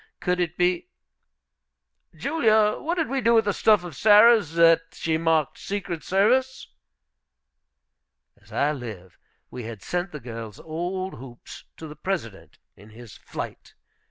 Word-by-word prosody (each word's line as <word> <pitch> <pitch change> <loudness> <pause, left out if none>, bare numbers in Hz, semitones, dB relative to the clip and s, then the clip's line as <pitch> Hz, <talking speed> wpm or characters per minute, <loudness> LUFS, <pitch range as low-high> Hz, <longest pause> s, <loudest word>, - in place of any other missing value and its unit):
Could 180 0 -1
it 175 -1 -2
be, 180 0 +1 1.3
"Julia, 220 - +2
what 335 +3 -2
did 325 -3 -1
we 270 +1 -2
do 235 0 +3
with 225 -1 +4
that 205 - +1
stuff 210 -3 +3
of 175 -5 -8
Sarah's 210 -3 +5
that 165 -1 +6
she 160 -1 -2
marked 160 -3 0
secret 195 -5 -5
service?" 245 - +1 1.7
As 105 +2 -22
I 140 +7 +1
live, 110 - -9 0.3
we 125 -2 -7
had 110 -3 -8
sent 175 - -3
the 150 - -7
girls' 115 -4 -8
old 180 +4 -4
hoops 120 -2 -12
to 160 - -8
the 150 - -10
President 150 - -5 0.2
in 105 +2 -17
his 115 0 -13
flight. - - -8
170 Hz, 145 wpm, -24 LUFS, 125-205 Hz, 1.7 s, that